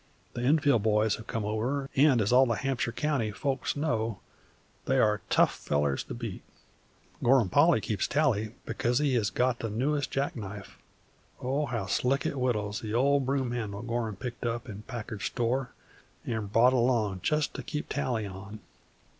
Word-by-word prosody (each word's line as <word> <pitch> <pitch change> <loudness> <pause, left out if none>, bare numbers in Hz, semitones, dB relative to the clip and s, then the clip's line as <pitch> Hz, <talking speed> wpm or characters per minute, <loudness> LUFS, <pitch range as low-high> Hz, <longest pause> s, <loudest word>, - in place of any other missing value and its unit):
The 120 - -4
Enfield 140 -2 +3
boys 105 0 +2
have 110 - -11
come 115 -2 -2
over, 125 +6 -1
and, 135 -4 +5
as 105 - +1
all 130 +1 +6
the 115 - +1
Hampshire 135 -2 -1
county 135 -3 0
folks 135 +4 -2
know, 115 -8 -1 0.7
they 135 - +2
are 105 -4 +3
tough - - +4
fellers 70 -1 -1
to - - -6
beat. 115 -5 -6 0.8
Gorham 120 -5 +4
Polly 145 - +4
keeps 105 -2 -1
tally, 120 -7 +1
because 120 +1 0
he 145 -2 +2
has 110 -5 +2
got 125 -1 +1
the 115 - -3
newest 140 +7 0
jack 135 +1 -1
knife, 100 -3 -8 0.6
oh, 140 +4 -1
how 115 -5 -2
slick 130 +7 +1
it - - +1
whittles 110 -6 -1
the 110 0 -3
old 140 +1 +3
broom 135 -2 0
handle 110 -3 -4
Gorham 115 -3 -2
picked 120 +5 -6
up 115 -1 -2
in 105 -1 -7
Packard's 110 -2 -6
store 125 +1 -1 0.6
an' 110 -3 -2
brought 115 +5 +4
along 115 -6 +1
jest 150 - 0
to 135 - -5
keep 150 +4 -4
tally 125 -6 -1
on! 100 +2 -8
120 Hz, 170 wpm, -29 LUFS, 105-135 Hz, 0.8 s, all